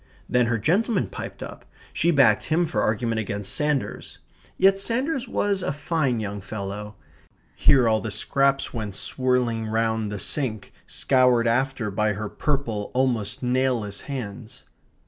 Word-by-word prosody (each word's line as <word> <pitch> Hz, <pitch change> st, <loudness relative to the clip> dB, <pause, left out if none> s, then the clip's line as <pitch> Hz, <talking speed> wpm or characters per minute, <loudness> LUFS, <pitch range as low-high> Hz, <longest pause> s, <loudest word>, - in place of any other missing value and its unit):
Then 125 Hz, -1 st, +2 dB
her 115 Hz, 0 st, +1 dB
gentleman 190 Hz, -, +1 dB
piped -, -, -7 dB
up; -, -, -9 dB, 0.3 s
she 170 Hz, -, +1 dB
backed 135 Hz, -10 st, +4 dB
him 165 Hz, +2 st, +2 dB
for 110 Hz, -10 st, -1 dB
argument 115 Hz, +1 st, 0 dB
against 100 Hz, -1 st, -3 dB
Sanders. 150 Hz, +2 st, -1 dB, 0.4 s
Yet 195 Hz, +1 st, +5 dB
Sanders 255 Hz, +5 st, -1 dB
was 200 Hz, -4 st, 0 dB
a 180 Hz, -, -1 dB
fine 145 Hz, -4 st, 0 dB
young 100 Hz, -1 st, -4 dB
fellow 105 Hz, +1 st, -6 dB, 0.6 s
(here 130 Hz, -4 st, +5 dB
all 110 Hz, -1 st, +2 dB
the 110 Hz, -, -4 dB
scraps 135 Hz, +6 st, +1 dB
went 105 Hz, -5 st, -4 dB
swirling 125 Hz, -3 st, 0 dB
round 110 Hz, -1 st, 0 dB
the 105 Hz, -, -3 dB
sink, 110 Hz, +1 st, -2 dB
scoured 125 Hz, -3 st, +3 dB
after 125 Hz, -2 st, 0 dB
by 105 Hz, +1 st, +1 dB
her 105 Hz, +1 st, -4 dB
purple, 120 Hz, -8 st, -2 dB
almost 120 Hz, -5 st, 0 dB
nailless 125 Hz, -5 st, 0 dB
hands). 125 Hz, -3 st, -6 dB
120 Hz, 145 wpm, -24 LUFS, 105-140 Hz, 0.6 s, Yet